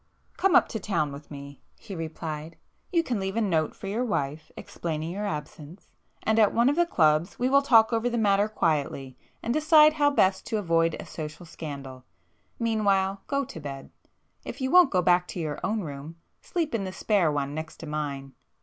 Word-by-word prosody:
"Come 385 Hz, -5 st, +2 dB
up -, -, +6 dB
to 220 Hz, -, -4 dB
town 170 Hz, -7 st, -1 dB
with 140 Hz, +2 st, -10 dB
me,"—he 140 Hz, +8 st, -11 dB
replied—"You 165 Hz, -, -5 dB
can 245 Hz, -9 st, -2 dB
leave 195 Hz, +1 st, -3 dB
a 230 Hz, -, +1 dB
note 165 Hz, -7 st, 0 dB
for -, -, -10 dB
your 210 Hz, +5 st, -1 dB
wife, 155 Hz, -, -3 dB
explaining 160 Hz, -1 st, -4 dB
your 205 Hz, +3 st, -3 dB
absence,—and 155 Hz, +7 st, -5 dB
at 210 Hz, -2 st, +4 dB
one 235 Hz, +3 st, +4 dB
of 290 Hz, -, +1 dB
the 345 Hz, +1 st, +2 dB
clubs 155 Hz, -, +2 dB
we 250 Hz, +1 st, +1 dB
will 275 Hz, +1 st, +5 dB
talk 230 Hz, -5 st, +5 dB
over 230 Hz, +2 st, +1 dB
the 240 Hz, -, -2 dB
matter 205 Hz, -2 st, +3 dB
quietly, 140 Hz, -8 st, -1 dB, 0.3 s
and 235 Hz, -, 0 dB
decide 310 Hz, 0 st, +6 dB
how 290 Hz, -2 st, +3 dB
best 190 Hz, -9 st, +2 dB
to 220 Hz, -, -1 dB
avoid 165 Hz, -4 st, +1 dB
a -, -, -7 dB
social 155 Hz, +2 st, -7 dB
scandal. 140 Hz, -5 st, -8 dB, 0.5 s
Meanwhile, 200 Hz, -4 st, +1 dB
go 280 Hz, 0 st, 0 dB
[p -, -, -11 dB
380] -, -, -13 dB
to -, -, -7 dB
bed. 140 Hz, -2 st, -8 dB, 0.5 s
If 260 Hz, -, -7 dB
you 260 Hz, 0 st, -1 dB
won't 360 Hz, -4 st, +7 dB
go 180 Hz, -5 st, +1 dB
back 180 Hz, 0 st, +3 dB
to -, -, -6 dB
your 155 Hz, -3 st, -3 dB
own 215 Hz, +1 st, 0 dB
room, 150 Hz, 0 st, -7 dB, 0.3 s
sleep 330 Hz, -6 st, -2 dB
in 225 Hz, -4 st, -1 dB
the 190 Hz, -, -4 dB
spare 190 Hz, -8 st, +1 dB
one 140 Hz, -1 st, -2 dB
next 160 Hz, +1 st, -6 dB
to -, -, -6 dB
mine." 145 Hz, -3 st, -4 dB
185 Hz, 195 wpm, -26 LUFS, 155-230 Hz, 0.5 s, won't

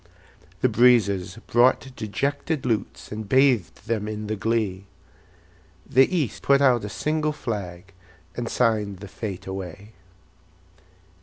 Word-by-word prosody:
The -, -, +4 dB
breezes 105 Hz, -6 st, +3 dB
brought 130 Hz, +2 st, +2 dB
dejected 140 Hz, +7 st, -2 dB
lutes, 115 Hz, -5 st, -2 dB
And 105 Hz, -1 st, -6 dB
bathed 125 Hz, -, +2 dB
them 110 Hz, -2 st, -2 dB
in 105 Hz, 0 st, -4 dB
the 110 Hz, +1 st, -2 dB
glee; 105 Hz, -3 st, -1 dB, 1.0 s
The 135 Hz, +1 st, +5 dB
East 160 Hz, -, -1 dB
put 140 Hz, 0 st, +4 dB
out 125 Hz, -5 st, +4 dB
a 105 Hz, -, -4 dB
single 155 Hz, +5 st, -1 dB
flag, 100 Hz, -8 st, -6 dB, 0.4 s
And 120 Hz, -1 st, -3 dB
signed 105 Hz, -5 st, +1 dB
the 100 Hz, +2 st, -9 dB
fete 95 Hz, -1 st, -6 dB
away. 95 Hz, +2 st, -7 dB
110 Hz, 125 wpm, -24 LUFS, 100-130 Hz, 1.0 s, The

